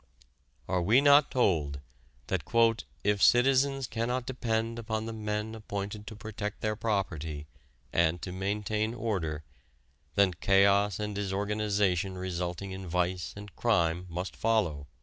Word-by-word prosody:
Are 90 0 +1
we 110 +9 +5
not 145 0 +6
told 80 - +1 0.5
that - - -1 0.6
"if 105 0 +2
the - - +1
citizens 135 +2 +4
cannot 120 +2 -2
depend 115 -3 -2
upon 110 -1 -3
the 115 - -5
men 105 0 -3
appointed 105 -1 -5
to 110 - -7
protect 105 -1 -6
their 110 0 0
property, 80 -9 -2 0.5
and 85 0 +2
to 90 - -4
maintain 105 +4 -1
order, 90 -10 -2 0.7
then 100 -2 +4
chaos 100 +2 +3
and 105 0 -3
disorganization 100 -2 0
resulting 90 +1 -4
in 95 0 -6
vice 90 0 -1
and 100 -3 -10
crime 90 -6 +1
must 90 +3 -4
follow?" 90 -11 0
100 Hz, 130 wpm, -29 LUFS, 90-110 Hz, 0.7 s, not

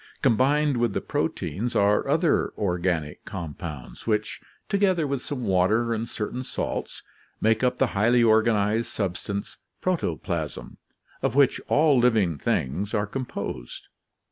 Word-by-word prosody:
Combined 140 +4 +3
with 120 -3 +1
the - - 0
proteins 120 +5 -2
are 100 0 +3
other - - +2
"organic" 90 -5 -1
compounds, 80 - -7
which, 105 -1 -1 0.3
together 195 -5 +2
with 140 -2 -2
some 135 -4 -4
water 110 +5 +2
and 115 +1 -3
certain 115 +4 -4
salts, - - -4 0.4
make 110 +2 +2
up 125 0 +2
the 135 - +3
highly 120 +4 +4
organized 110 0 +3
substance, 100 +1 -4 0.2
protoplasm, 85 - -3 0.4
of - - 0
which 140 -1 +4
all 150 -3 +4
living 110 - +2
things 100 - -1
are 105 -1 +1
composed. 105 - -6
110 Hz, 125 wpm, -25 LUFS, 95-125 Hz, 0.4 s, highly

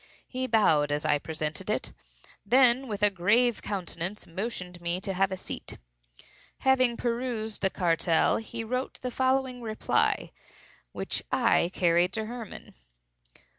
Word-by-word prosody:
He 255 0 -3
bowed 155 -11 +3
as 145 0 -1
I 145 - +3
presented 155 0 -4
it; - - -2 0.5
then, 255 +4 +5
with 210 -2 -4
a 205 - +6
grave 220 +6 +2
countenance, 190 0 -4
motioned 180 -1 -5
me 170 +1 -1
to 195 +1 -4
a 190 0 0
seat. - - -7 0.8
Having 255 -3 +3
perused 235 -3 -2
the 190 - +2
cartel, 165 -3 +2
he 225 +1 -5
wrote 250 +3 -3
the 250 - -2
following 260 -1 0
reply, 220 -2 0 0.6
which - - -3
I 230 -8 +3
carried 175 +1 +2
to 220 -1 -2
Hermann. 235 -1 -8
215 Hz, 130 wpm, -28 LUFS, 180-245 Hz, 0.8 s, a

